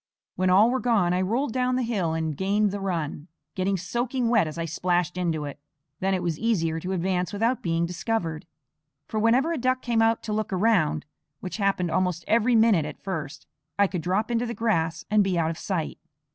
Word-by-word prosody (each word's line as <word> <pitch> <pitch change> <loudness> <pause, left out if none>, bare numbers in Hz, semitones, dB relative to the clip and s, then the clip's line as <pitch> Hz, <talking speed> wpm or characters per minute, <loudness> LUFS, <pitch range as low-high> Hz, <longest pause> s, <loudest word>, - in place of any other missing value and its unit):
When 185 0 +1
all 205 +6 +6
were 260 - 0
gone 215 -8 +2
I 180 - +1
rolled 230 +6 0
down 255 0 +1
the 255 - 0
hill 195 -9 -1
and 160 -2 -2
gained 200 +4 +1
the 205 - -4
run, 165 -5 -3 0.3
getting 190 +1 0
soaking 240 +7 -1
wet 225 -8 +3
as 155 - -7
I 165 - -2
splashed 175 +1 0
into 165 -4 -1
it. 145 0 -7 0.4
Then 190 0 +1
it 180 - -2
was 165 -3 -2
easier 165 -8 0
to 180 +3 -4
advance 180 0 -1
without 225 +5 0
being 170 0 0
discovered; 170 -3 -3 0.6
for 220 - -2
whenever 250 +9 +3
a 320 - -2
duck 255 +1 0
came 235 -2 +1
out 225 0 +2
to 215 - -3
look 215 -1 -2
round 190 -5 +2 0.3
which 185 - -5
happened 195 -5 0
almost 180 -2 0
every 230 +2 +3
minute 220 -7 +5
at 150 - -8
first 160 -8 -5 0.3
I 200 - +5
could 185 -3 -3
drop 195 +7 0
into 235 +1 0
the 235 - -4
grass 165 -8 0
and 215 -1 +5
be 190 -2 0
out 165 -1 +1
of 165 - -7
sight. 175 -6 -3
190 Hz, 210 wpm, -26 LUFS, 170-225 Hz, 0.6 s, all